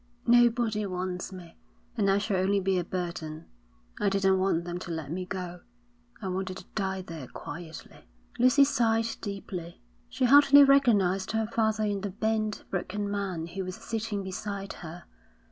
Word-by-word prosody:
Nobody 235 -2 +4
wants 180 0 -4
me, 175 -3 -11 0.4
and 205 -4 +2
I 195 - +4
shall 205 -1 0
only 195 +2 +2
be 190 -1 +1
a - - -1
burden. 170 -3 -5 0.5
I 205 - +2
didn't 195 -1 +2
want 185 -3 +1
them 175 0 -4
to 175 - -8
let 160 -3 -4
me 180 +2 -4
go. 180 -2 -5 0.6
I 200 - -5
wanted 185 0 -3
to 185 - -11
die 190 -2 -2
there 160 -7 -8
quietly.' 165 +3 -9 0.3
Lucy 255 +3 +6
sighed 230 -4 +1
deeply. 190 -4 -6 0.3
She - - 0
hardly 285 +2 +8
recognised 215 -10 +3
her 220 0 +1
father 220 -1 0
in 205 -2 -1
the 205 - -3
bent, 215 +1 -1
broken 200 +2 -2
man 190 -5 -2
who 190 +3 -5
was 185 0 -5
sitting 220 -3 -3
beside 195 +1 -5
her. 175 0 -8
195 Hz, 160 wpm, -28 LUFS, 180-220 Hz, 0.6 s, hardly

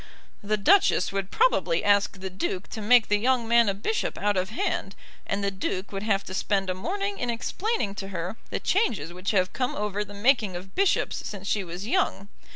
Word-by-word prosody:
"The 215 +1 0
Duchess 340 - +4
would 195 -1 -3
probably - - +2
ask 200 -1 +2
the 190 0 -5
Duke 185 +1 -3
to 220 - -6
make 230 +2 +5
the 210 0 +2
young 245 0 +1
man 235 -2 +5
a 195 - -1
bishop 435 - -2
out 205 0 +1
of 185 0 0
hand, 200 -2 -2 0.3
and 200 +1 -1
the 200 - 0
Duke 190 0 -3
would 195 -1 -4
have 200 -2 +1
to 185 - -8
spend 195 -1 0
a - - 0
morning 395 - -3
in 245 - -2
explaining 235 - -1
to 195 - -7
her 180 +1 -4
the - - -2
changes 205 - 0
which 180 +2 -4
have 185 -3 +1
come 250 -1 -1
over 210 0 -2
the 205 0 -11
making 215 -3 +2
of 185 +2 -8
bishops 390 -2 +1
since 200 -1 -7
she 205 -1 +1
was 175 +2 -7
young. 220 - 0
205 Hz, 210 wpm, -26 LUFS, 195-235 Hz, 0.3 s, make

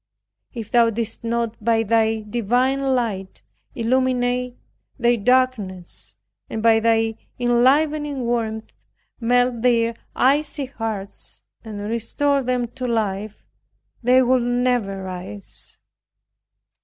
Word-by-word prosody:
If 225 -4 -7
Thou 235 -1 +5
didst 225 +1 -4
not 230 -1 -2
by 225 0 +3
thy 225 0 +2
divine 240 +5 0 0.2
light, 200 -6 -3 0.3
illuminate 250 0 0 0.4
their 240 -2 +3
darkness, 225 -6 0 0.3
and 220 - -4
by 225 -1 +5
thy 225 0 +2 0.2
enlivening 280 +4 +2
warmth, 225 -2 -2 0.5
melt 245 0 +2
their 230 -1 +3 0.2
icy 285 +2 +2
hearts, 220 -6 -6 0.2
and 215 -3 -7
restore 275 +5 0
them 250 -1 0
to 255 +1 -5
life, 215 -2 -2 0.6
they 255 +2 +5
would 255 0 +3
never 245 -5 0
rise. 180 - -8
235 Hz, 105 wpm, -22 LUFS, 220-250 Hz, 0.6 s, Thou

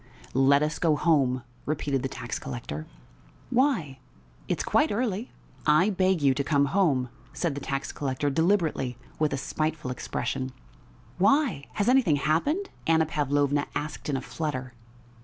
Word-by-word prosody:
"Let 140 +2 +5
us 155 +1 -2
go 160 -3 +3
home," 135 -6 +2 0.2
repeated 145 -3 0
the 135 - -2
tax 120 -2 -5
collector. 120 - -6 0.6
"Why? 225 - +1 0.5
It's - - -1
quite - - +2
early!" 220 0 -1 0.4
"I 155 +8 +5
beg 185 -4 +2
you 135 -1 +5
to 140 +2 -1
come 140 0 +3
home!" 145 -11 +2 0.2
said 170 -5 -1
the 140 - -5
tax 135 0 -3
collector 140 0 -1
deliberately, 160 - +1 0.2
with 155 -1 +2
a 140 - -1
spiteful 155 0 -2
expression. 130 +1 -3 0.7
"Why? 205 - +3
Has 205 - 0
anything 250 - +4
happened?" 285 - 0 0.2
Anna 160 0 +4
Pavlovna 145 -1 +1
asked 150 0 -4
in 140 - +1
a - - -4
flutter. 130 -6 -4
150 Hz, 145 wpm, -27 LUFS, 135-175 Hz, 0.7 s, Let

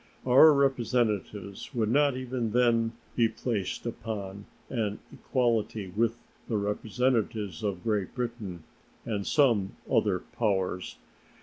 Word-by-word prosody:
Our 130 +5 +8
representatives 120 -6 0
would 110 -2 +1
not 140 0 +3
even 125 -3 -3
then 115 -2 +3 0.2
be 115 -2 +3
placed 110 -4 -3
upon 105 -4 -5 0.2
an 110 -5 -2 0.2
equality 115 -5 0
with 115 +1 +1 0.3
the 110 - +1
representatives 105 -2 -1
of 100 -4 -2
Great 105 -4 -1
Britain 115 -9 -4 0.4
and 110 -3 -1
of 100 - -5
some 115 -10 +3
other 100 -3 +2
powers. 95 -2 -2
115 Hz, 115 wpm, -29 LUFS, 100-125 Hz, 0.4 s, Our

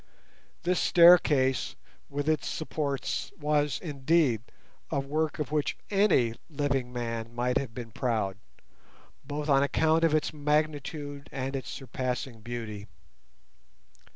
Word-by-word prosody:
This 180 +1 +1
staircase 150 -8 +5 0.3
with 145 +1 -3
its 155 -1 +1
supports 145 -3 -2
was, 150 -2 +1
indeed, 145 - +2 0.5
a 145 - 0
work 150 +3 -1
of 150 -2 -3
which 150 -2 0
any 195 - +3 0.2
living 140 -4 -1
man 115 -1 -4
might 125 +1 +1
have 120 -5 -6
been 120 -2 -7
proud, 105 -4 -1 0.8
both 145 +1 -4
on 140 -2 +5
account 160 +4 +2
of 160 -2 +4
its 155 - 0
magnitude 145 -1 -1
and 135 0 -3
its 135 - -4
surpassing 130 -3 -4
beauty. 110 -3 -6
140 Hz, 120 wpm, -29 LUFS, 125-155 Hz, 0.8 s, staircase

